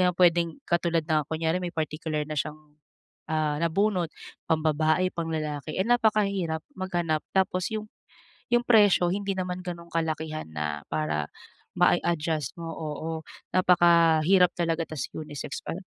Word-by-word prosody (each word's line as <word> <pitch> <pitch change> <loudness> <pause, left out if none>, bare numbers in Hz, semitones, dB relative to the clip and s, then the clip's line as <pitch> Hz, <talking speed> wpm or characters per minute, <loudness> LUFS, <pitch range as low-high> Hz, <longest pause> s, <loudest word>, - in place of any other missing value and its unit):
naman 180 - -2
pwedeng 170 -1 +4 0.2
katulad 170 -1 +1
na 155 -2 +2
kunyare 160 +2 0
may 175 -1 -4
particular 155 0 -2
na 155 - -4
siyang, 150 +1 -2 0.7
ah, 155 -1 +1
nabunot, 180 +1 +1 0.4
pambabae, 160 +3 +2
panglalaki, 155 -3 -3
eh - - +3
napakahirap 200 -8 +2 0.2
maghanap. 175 -4 -1
Tapos 185 -1 +1
yung 215 0 -4 0.6
yung 240 0 +4
presyo 205 -6 +5
hindi 200 +1 -1
naman 185 -1 -3
ganun 170 -1 -6
kalakihan 160 -1 -2
na 75 -1 -3
para 75 -1 -1 0.5
mai-adjust 160 -2 +1
mo 165 - -5
oo. 160 0 -5 0.4
Napakahirap 175 0 +5
talaga 165 -1 0
tapos 150 -5 -4
unisex 150 -2 -6
pa. - - -3
165 Hz, 130 wpm, -27 LUFS, 155-180 Hz, 0.7 s, presyo